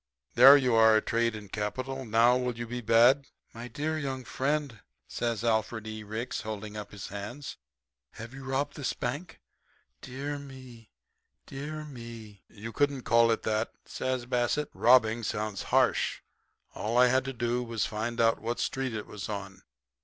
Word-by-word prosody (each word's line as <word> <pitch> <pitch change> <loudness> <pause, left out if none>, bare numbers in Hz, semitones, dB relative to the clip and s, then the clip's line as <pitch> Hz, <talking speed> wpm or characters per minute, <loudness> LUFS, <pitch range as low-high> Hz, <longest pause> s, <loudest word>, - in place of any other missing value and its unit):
There 135 +4 +10
you 130 -4 +1
are, 110 -1 +6
trade 115 0 0
and 105 -3 -10
capital. 130 +5 -3
Now, 115 +2 +4
will 125 -2 -2
you 120 - -4
be 120 +1 -5
bad?' 120 +5 +5 0.3
"'My 120 +1 -8
young 145 -3 -2
friend,' 140 -3 -2 0.3
says 115 -2 -2
Alfred 110 -1 0
E. 110 0 -6
Ricks, 110 +4 -4
holding 110 -1 -6
up 105 -1 -7
his 100 -1 -8
hands, 110 +8 -7 0.6
'have 115 +3 -9
you 135 0 -9
robbed 135 +2 -2
this 140 -4 -2
bank? 145 +9 -5 0.6
Dear 140 +3 -5
me, 130 -5 -12 0.6
dear 155 +3 -6
me!' 115 -7 -10
"'You 110 +2 -9
couldn't 140 -3 0
call 115 0 +4
it 115 - 0
that,' 110 0 -1
says 130 -2 -3
Bassett. 125 +4 0
'Robbing" 115 -1 +4
sounds 105 -2 -3
harsh. - - +1 0.5
All 115 +3 -2
I 125 - +7
had 130 +1 +3
to 135 - -3
do 120 0 -1
was 115 -2 -2
to - - -1
find 110 +2 -3
out 115 -1 +3
what 115 +2 -3
street 130 -3 -2
it 105 - -4
was 105 -1 -7
on. 100 -2 -6
120 Hz, 165 wpm, -29 LUFS, 110-130 Hz, 0.6 s, There